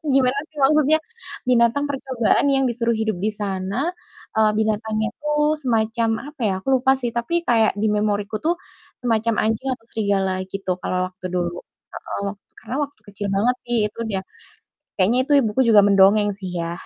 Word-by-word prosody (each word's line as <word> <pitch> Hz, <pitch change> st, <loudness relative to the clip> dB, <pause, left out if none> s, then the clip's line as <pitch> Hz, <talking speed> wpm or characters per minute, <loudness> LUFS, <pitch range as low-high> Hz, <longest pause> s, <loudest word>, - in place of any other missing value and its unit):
Gimana 265 Hz, 0 st, +3 dB
sih 310 Hz, -, -14 dB
maksudnya? 305 Hz, +2 st, +4 dB, 0.5 s
Binatang 245 Hz, +3 st, +3 dB
percobaan 265 Hz, -1 st, +1 dB
yang 270 Hz, 0 st, +2 dB
disuruh 235 Hz, -1 st, 0 dB
hidup 220 Hz, -3 st, -1 dB
di 215 Hz, +2 st, 0 dB
sana. 200 Hz, -, -2 dB, 0.4 s
Eee, 220 Hz, -1 st, +4 dB
binatangnya 220 Hz, 0 st, 0 dB
itu 300 Hz, -1 st, -3 dB, 0.3 s
semacam 225 Hz, -1 st, +1 dB, 0.2 s
apa 295 Hz, -, -29 dB
ya? -, -, +1 dB
Aku -, -, -8 dB
lupa 265 Hz, +1 st, +4 dB
sih, 240 Hz, -2 st, -2 dB
tapi 335 Hz, +9 st, 0 dB
kayak 225 Hz, -2 st, +4 dB
di 220 Hz, -, +1 dB
memoriku 210 Hz, 0 st, 0 dB
tuh, 345 Hz, +2 st, +2 dB, 0.5 s
semacam 230 Hz, -1 st, +1 dB
anjing 225 Hz, +4 st, -1 dB
atau 225 Hz, -, -21 dB
serigala 195 Hz, -3 st, 0 dB
gitu, 195 Hz, -1 st, -4 dB
kalau 185 Hz, 0 st, -1 dB
waktu 185 Hz, 0 st, -8 dB
dulu. 175 Hz, 0 st, -2 dB, 0.3 s
Heeh, 200 Hz, -, -4 dB, 0.3 s
karena 255 Hz, -, -5 dB
waktu 285 Hz, 0 st, -15 dB
kecil 205 Hz, 0 st, -5 dB
banget 245 Hz, +5 st, +2 dB
sih, 240 Hz, -1 st, 0 dB
itu 210 Hz, -, -11 dB
dia. 190 Hz, -1 st, -2 dB, 0.8 s
Kayaknya 215 Hz, +7 st, +3 dB
itu 295 Hz, -, +2 dB
ibuku 220 Hz, +3 st, -1 dB
juga 210 Hz, -3 st, +7 dB
mendongeng 200 Hz, +1 st, +5 dB
sih 185 Hz, -2 st, -6 dB
ya, 170 Hz, +1 st, -4 dB
220 Hz, 165 wpm, -22 LUFS, 200-250 Hz, 0.8 s, juga